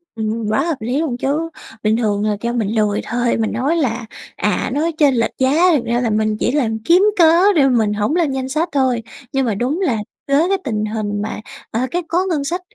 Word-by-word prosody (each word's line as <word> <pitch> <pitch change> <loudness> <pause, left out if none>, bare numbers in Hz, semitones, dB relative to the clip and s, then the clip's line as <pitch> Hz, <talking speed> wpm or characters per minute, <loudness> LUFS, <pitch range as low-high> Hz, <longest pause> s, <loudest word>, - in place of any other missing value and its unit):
Ừm, 220 0 -2
quá 215 +6 +2
hợp 330 -1 -1
lý 245 +5 -2
luôn 295 -7 -2
chứ, 295 +6 -1 0.3
bình 215 +1 +2
thường 210 -3 0
là 210 -1 0
kêu 235 0 -2
mình 230 -4 0
lươi 210 -2 +1
thôi 240 0 0
mình 225 -1 -1
nói 265 +9 0
là: 245 -6 -1 0.3
"À, 210 - -1
nói 315 +4 0
chênh 285 -4 +4
lệch 230 -1 +1
giá." 305 +8 +3
thực 250 -5 -1
ra 235 +1 0
là 240 - 0
mình 215 0 0
chỉ - - +1
làm 235 -6 0
kiếm 355 +3 +5
cớ 345 +4 +5
để 280 -4 +5
mình 220 -4 +2
hổng 210 +9 0
lên 335 -5 +1
danh 265 -1 -3
sách 315 +5 -1
thôi, 260 -5 +1 0.3
nhưng 270 -1 +1
mà 220 -4 0
đúng 260 - -1
là 265 - +1 0.3
với 340 +8 +3
tình 215 -4 -2
hình 210 -1 -3
mà, 210 0 -4 0.3
ờ, 225 - -1
cái 355 - 0
có 355 +3 +1
ngân 305 -5 0
sách 345 +6 -2
245 Hz, 230 wpm, -18 LUFS, 220-310 Hz, 0.3 s, kiếm